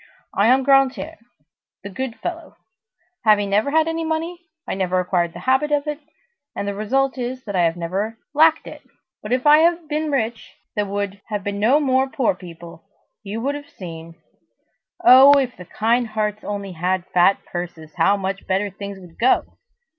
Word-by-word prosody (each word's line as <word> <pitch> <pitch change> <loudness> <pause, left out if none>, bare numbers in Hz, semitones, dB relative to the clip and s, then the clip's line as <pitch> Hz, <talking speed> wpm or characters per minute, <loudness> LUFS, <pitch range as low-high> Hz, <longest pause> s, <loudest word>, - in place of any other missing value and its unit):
I 200 - +3
am 260 +2 +4
Grantaire, 270 -6 +2 0.7
the 200 - -7
good 260 +3 -4
fellow. 335 -1 -6 0.7
Having 205 -2 +3
never 210 +7 +2
had 320 +2 +2
any 325 0 -2
money, 325 +2 -3 0.3
I - - -2
never 185 -1 0
acquired 175 -2 0
the 175 - -9
habit 265 +7 +1
of 290 0 +1
it, 300 -1 -4 0.6
and 200 - -3
the 200 - -2
result 260 +6 0
is 250 +1 -4
that 205 -4 -5
I 175 -2 +3
have 165 +1 0
never 195 +6 -3 0.2
lacked 320 +2 +4
it; - - -10 0.4
but, 210 - -7
if 250 +2 0
I 300 +1 +7
had 335 0 +2
been 305 +1 -2
rich, 235 -5 -3 0.2
there 210 -1 -1
would 200 0 -4
have 210 -3 -4
been 200 0 -3
no 245 +8 +4
more 265 -2 +1
poor 265 -7 +1
people! 170 -2 -12 0.4
You 215 +2 -5
would 275 +4 -1
have 290 0 -8
seen! 165 -2 -10 0.9
Oh, 270 -2 +9
if 260 -3 0
the 180 - -11
kind 230 +6 0
hearts 215 -1 -3
only 200 -2 -5
had 180 +1 -1
fat 180 +2 +5
purses, 170 -3 -7
how 200 +1 +3
much 195 0 -4
better 195 +2 0
things 200 0 -8
would 175 -3 -16
go! 250 +3 +3
215 Hz, 185 wpm, -21 LUFS, 190-270 Hz, 0.9 s, Oh